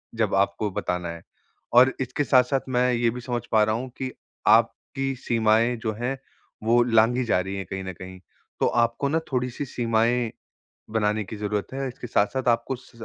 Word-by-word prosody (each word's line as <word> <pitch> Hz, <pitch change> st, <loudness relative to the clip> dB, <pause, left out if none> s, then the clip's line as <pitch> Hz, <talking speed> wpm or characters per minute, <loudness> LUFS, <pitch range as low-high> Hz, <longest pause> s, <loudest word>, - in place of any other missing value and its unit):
जब 110 Hz, -3 st, 0 dB
आपको 100 Hz, +2 st, +1 dB
बताना 90 Hz, -2 st, -2 dB
है। 85 Hz, 0 st, -7 dB, 0.5 s
और 125 Hz, +2 st, +7 dB
इसके 130 Hz, +3 st, -1 dB
साथ-साथ 130 Hz, 0 st, +3 dB
मैं 125 Hz, 0 st, +2 dB
ये 120 Hz, 0 st, +2 dB
भी 125 Hz, +2 st, -5 dB
समझ 120 Hz, -1 st, -2 dB
पा 110 Hz, -1 st, +5 dB
रहा 110 Hz, 0 st, +1 dB
हूँ 130 Hz, +3 st, -4 dB
कि 130 Hz, -1 st, -3 dB, 0.4 s
आपकी 135 Hz, 0 st, +2 dB
सीमाएँ 115 Hz, +1 st, +2 dB
जो 110 Hz, -1 st, -2 dB
हैं, 120 Hz, +5 st, -3 dB, 0.5 s
वो 120 Hz, +2 st, +4 dB
लाँघी 120 Hz, +2 st, +3 dB
जा 110 Hz, -, +2 dB
रही 95 Hz, +1 st, -4 dB
है 95 Hz, -, -3 dB
कहीं 95 Hz, +2 st, -5 dB
न 95 Hz, 0 st, -5 dB
कहीं, 95 Hz, +2 st, -10 dB, 0.4 s
तो -, -, +2 dB
आपको 120 Hz, +3 st, +1 dB
ना 160 Hz, +3 st, +2 dB
थोड़ी-सी 125 Hz, +2 st, -2 dB
सीमाएँ 115 Hz, -1 st, +1 dB, 0.6 s
बनाने 105 Hz, -1 st, +1 dB
की 105 Hz, -, -8 dB
ज़रूरत 105 Hz, -1 st, -2 dB
है, 135 Hz, 0 st, -2 dB
इसके 125 Hz, -1 st, -8 dB
साथ-साथ 120 Hz, +4 st, 0 dB
आपको 115 Hz, +2 st, +1 dB
उस 130 Hz, 0 st, -11 dB
115 Hz, 185 wpm, -25 LUFS, 105-125 Hz, 0.6 s, और